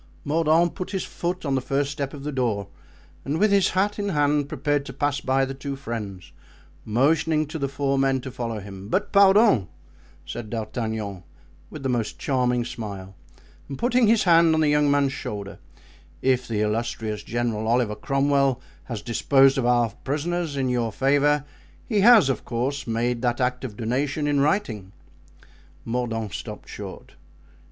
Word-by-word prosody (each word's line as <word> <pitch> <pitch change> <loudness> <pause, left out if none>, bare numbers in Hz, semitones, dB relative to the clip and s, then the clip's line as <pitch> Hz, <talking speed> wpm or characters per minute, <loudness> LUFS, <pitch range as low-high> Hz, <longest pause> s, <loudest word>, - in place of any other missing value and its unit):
Mordaunt 160 +3 +2
put 185 - -5
his 190 - -1
foot 175 0 -4
on 140 - 0
the 130 - +1
first 140 +2 -1
step 140 -2 -4
of 140 -2 -9
the 150 - -3
door 115 -7 -1 0.5
and, 145 +3 -2
with 215 0 +3
his 195 -2 +4
hat 205 +2 +1
in 205 0 -1
hand, 145 -3 +1
prepared 145 -1 0
to 135 - -7
pass 145 +1 0
by 135 +1 +2
the 135 - -5
two 140 +1 -5
friends, 105 - -6 0.5
motioning 155 +7 +2
to 155 +2 -6
the 140 - 0
four 140 0 -1
men 135 -1 +2
to 130 - -7
follow 120 -3 -4
him. 100 0 -9
"But, 205 - 0
pardon," 200 - +5 0.6
said 120 -3 -6
D'Artagnan, 110 -3 -4 0.5
with 155 -3 -9
the 135 - -1
most 120 -3 -1
charming 125 -3 0
smile 100 -5 -7 0.6
and 135 - -5
putting 245 -1 +3
his 225 0 +4
hand 165 -2 +5
on 160 - +2
the 155 - +3
young 150 0 +3
man's 140 -1 +2
shoulder, 100 -1 -6 0.6
"if 130 -1 +2
the 110 -2 -1
illustrious 110 0 -2
General 115 -2 -2
Oliver 120 -2 +2
Cromwell 140 0 +1 0.3
has 115 -5 -6
disposed 135 +3 +3
of 120 - 0
our 120 -2 +3
prisoners 155 +2 -2
in 135 -1 0
your 120 -2 0
favour, 145 +3 +2 0.4
he 215 -4 0
has, 220 - +7
of 135 - -1
course, 130 +4 -3
made 115 +1 -1
that 120 -1 0
act 125 0 0
of 115 -5 -6
donation 135 +6 -1
in 145 -1 +2
writing." 120 - 0 0.9
Mordaunt 115 -4 -2
stopped - - -7
short. - - -9
135 Hz, 170 wpm, -24 LUFS, 115-150 Hz, 0.9 s, has